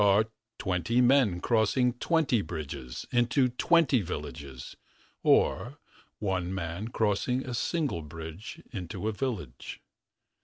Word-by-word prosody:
Are 100 +2 +5 0.3
twenty 95 +5 0
men 125 -8 +4
crossing 120 +2 +2
twenty 140 -3 +2
bridges. 70 -7 -6
41 120 - +3
Into 125 +2 +3
twenty 145 0 +3
villages. 70 -7 -6 0.5
Or - - +3 0.4
one 95 -3 -1
man 90 +2 -3
Crossing 115 +3 0
a 125 - -4
single 140 - -1
bridge 80 - -8
into 95 0 -4
a - - +2
village. 100 - -4
105 Hz, 115 wpm, -29 LUFS, 85-125 Hz, 0.5 s, Are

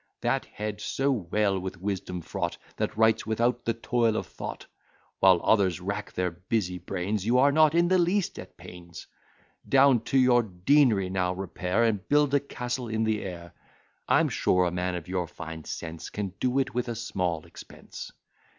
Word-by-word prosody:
That - - 0
head 105 -1 -6
so 135 +5 0
well 100 -3 0
with 95 -1 -6
wisdom 95 -2 -3
fraught, - - -3 0.2
That - - -2
writes 110 0 +3
without 120 +2 0
the 115 - 0
toil 115 -1 +1
of - - -2
thought! - - -7 0.5
While 95 -2 +6
others 95 -6 +3
rack 100 +3 -4
their 90 -1 -1
busy 90 +1 -2
brains, 95 +3 -3
You 120 +4 +2
are 140 +2 +5
not 155 +1 +4
in 170 0 +4
the 185 +1 +3
least 180 +2 0
at - - -11
pains. 85 -1 -11 0.6
Down 135 -2 +6
to 135 - +1
your 125 -2 +5
dean'ry 105 0 +2
now 90 -1 0
repair, 95 +3 -1
And 105 -5 0
build 145 -1 +3
a 145 - +5
castle 125 -2 -4
in 110 0 -1
the 110 -1 0
air. 85 -3 -7 0.5
I'm - - +4
sure 90 0 +2
a 85 - 0
man 90 +1 -2
of 85 -1 -6
your 90 -1 -2
fine 80 -2 -8
sense 80 -1 -6
Can 100 -3 -4
do 130 +1 0
it 130 -1 0
with 125 +1 -1
a 120 - -3
small 90 -8 -2
expense. - - -11
105 Hz, 180 wpm, -27 LUFS, 90-125 Hz, 0.6 s, While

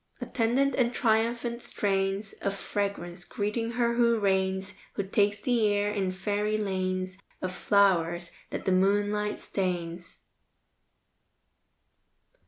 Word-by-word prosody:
Attendant 255 +4 +1
and 245 -2 +1
triumphant 235 +1 +1
strains 195 0 -1
Of 200 0 -1
fragrance, 195 -3 -3
greeting 220 +5 -2
her 235 0 +2
who 235 -1 +4
reigns, 190 -1 +1 0.2
Who 200 - 0
takes 205 +1 +1
the 240 -5 +3
air 205 0 +1
in 195 -3 0
fairy 205 +3 -1
lanes 185 -2 -2 0.2
Of 185 0 -3
flowers, 175 -4 +2 0.2
that - - -5
the 190 - +2
moonlight 205 +2 +2
stains. 175 -2 -3
200 Hz, 110 wpm, -28 LUFS, 190-220 Hz, 0.2 s, who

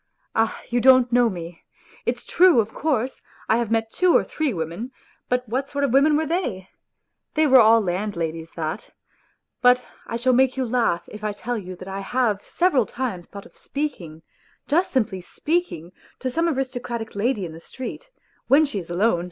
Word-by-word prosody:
Ah, 225 0 +1
you 240 0 +1
don't 255 -1 +6
know 240 -1 +4
me! 170 -3 -8 0.4
It's - - -1
true, 355 -7 +5
of 220 0 -1
course, 265 -5 -1 0.3
I 225 - +3
have 235 -2 -1
met 225 0 0
two 365 -2 +4
or - - +1
three 310 -2 -2
8 - - -2
women, 170 - -4 0.4
but 250 0 0
what 260 +5 -2
sort 285 0 -3
of 270 -4 +1
women 295 +2 +5
were 315 - 0
they? 250 - -2 0.7
They 310 0 +4
were 265 -3 +7
all 225 0 +7
land 200 +1 -2
ladies, 165 0 -4
that... 160 +4 -5 0.7
But 250 0 +5 0.2
I 230 - -3
shall 255 +2 +2
make 260 +1 +3
you 260 - 0
laugh 230 -7 +1
if 215 0 -10
I 210 -1 -1
tell 240 +4 -4
you 185 -2 -8
that 185 +1 -11
I 195 0 -4
have 210 0 0
several 315 - +1
times 230 -9 -4
thought 200 -1 -10
of - - -18
speaking, 180 - -5 0.4
just 345 +5 +2
simply 220 -8 0
speaking, 295 - -2 0.3
to 255 - -3
some 335 +6 +1
aristocratic 245 -5 -3
lady 205 -1 0
in 165 - -7
the 165 - -10
street, 260 - -8 0.4
when 295 +4 +6
she 245 -9 -3
is 170 - -9
alone 175 +1 +2
235 Hz, 195 wpm, -23 LUFS, 195-265 Hz, 0.7 s, were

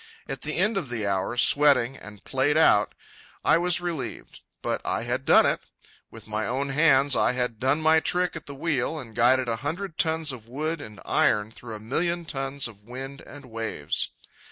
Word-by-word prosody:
At 135 -2 -5
the 155 - -3
end 210 +4 +2
of 160 -9 -3
the 115 -4 -3
hour, 100 +4 -1
sweating 140 -1 +5
and 105 -3 -12
played 140 +3 +1
out, 105 -10 +4 0.5
I 165 - +5
was 175 0 +2
relieved. 160 -10 -5 0.2
But - - -1
I - - -1
had 125 +3 -3
done - - +6
it! - - +1 0.5
With 115 -1 -13
my 110 -1 -3
own 135 +3 -1
hands 140 -1 +4
I - - +3
had 125 -3 -2
done 135 +4 +1
my 160 0 +5
trick 180 +2 0
at 165 - -8
the 140 - -8
wheel 150 0 -1
and 120 -7 -7
guided 125 +1 +3
a 115 -1 -1
hundred 160 - -5
tons 160 -2 +2
of 115 -3 -10
wood 155 +6 -3
and 105 -2 -10
iron 105 +1 +2
through 115 -1 -9
a - - -8
few 110 - -14
million 170 +6 -1
tons 135 -2 -2
of 105 -4 -14
wind 135 +3 -8
and 145 -1 -11
waves. 115 - -3
135 Hz, 200 wpm, -26 LUFS, 115-155 Hz, 0.5 s, done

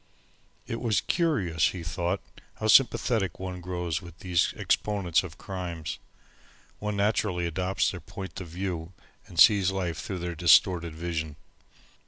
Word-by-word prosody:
It 115 - -4
was 110 -6 +2
curious, 100 - +1
he 90 -3 -5
thought, 85 +2 -2 0.3
how - - -5
sympathetic 115 -7 +4
one 90 -1 -5
grows 90 -2 -3
with 85 -2 -12
these 90 0 +1
exponents 100 -6 +1
of 85 -3 -9
crimes. 90 -5 -5 0.8
One 105 -1 -3
naturally 100 -3 +1
adopts 90 +3 0
their 90 - -7
point 95 +2 -8
of 90 - -7
view 90 0 -4 0.3
and 85 - -6
sees 100 -2 +7
life 90 -4 -2
through 95 - -4
their 85 0 -4
distorted 85 0 +4
vision. 80 -2 -3
90 Hz, 140 wpm, -27 LUFS, 85-95 Hz, 0.8 s, sees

